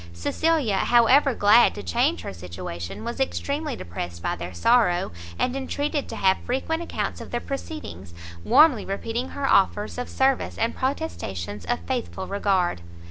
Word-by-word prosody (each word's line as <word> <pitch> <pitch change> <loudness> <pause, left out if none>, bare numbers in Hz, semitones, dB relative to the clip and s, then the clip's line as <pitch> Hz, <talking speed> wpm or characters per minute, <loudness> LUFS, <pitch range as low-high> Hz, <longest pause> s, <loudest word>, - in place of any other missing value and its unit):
Cecilia, 255 - +1
however 245 +5 +4
glad 210 +4 +5
to - - -6
change 85 -1 +1
her 95 - -6
situation, 85 0 -7
was 235 +2 -5
extremely 280 +1 -2
depressed 85 0 -6
by - - 0
their 90 +1 -6
sorrow, 175 - +2 0.3
and 255 - 0
entreated 285 +2 -2
to - - -5
have 190 -1 +2
frequent 295 +6 -2
accounts 340 - -3
of - - -9
their 240 - -2
proceedings, 275 - -7 0.3
warmly 295 - +5
repeating 225 +5 -3
her 280 -1 -3
offers 205 +3 +2
of 245 - -4
service, 265 -1 +1
and 230 +1 0
protestations 105 - -3
of 240 - -1
faithful 240 -7 -3
regard. 190 - 0
230 Hz, 150 wpm, -24 LUFS, -, 0.3 s, glad